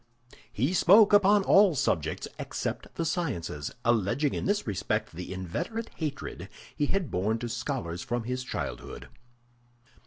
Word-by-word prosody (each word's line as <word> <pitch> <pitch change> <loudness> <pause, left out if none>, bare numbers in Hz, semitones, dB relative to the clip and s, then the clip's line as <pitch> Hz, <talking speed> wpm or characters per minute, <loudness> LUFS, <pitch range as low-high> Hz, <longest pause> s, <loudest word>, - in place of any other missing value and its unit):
He 135 - 0
spoke 200 +4 +6
upon 205 0 +6
all 195 -3 +5
subjects 80 - -1
except - - -4
the 165 - -1
sciences, 110 - -2 0.2
alleging 120 +5 +2
in - - -3
this 205 +1 +1
respect 100 -4 -2
the 90 +3 -7
inveterate 150 - -4
hatred 150 -4 -5 0.3
he 145 - 0
had 190 -3 -1
borne 105 +5 0
to 120 +1 -4
scholars 115 - -3
from 120 -2 -2
his 125 +2 -3
childhood. - - -6
130 Hz, 135 wpm, -28 LUFS, -, 0.3 s, spoke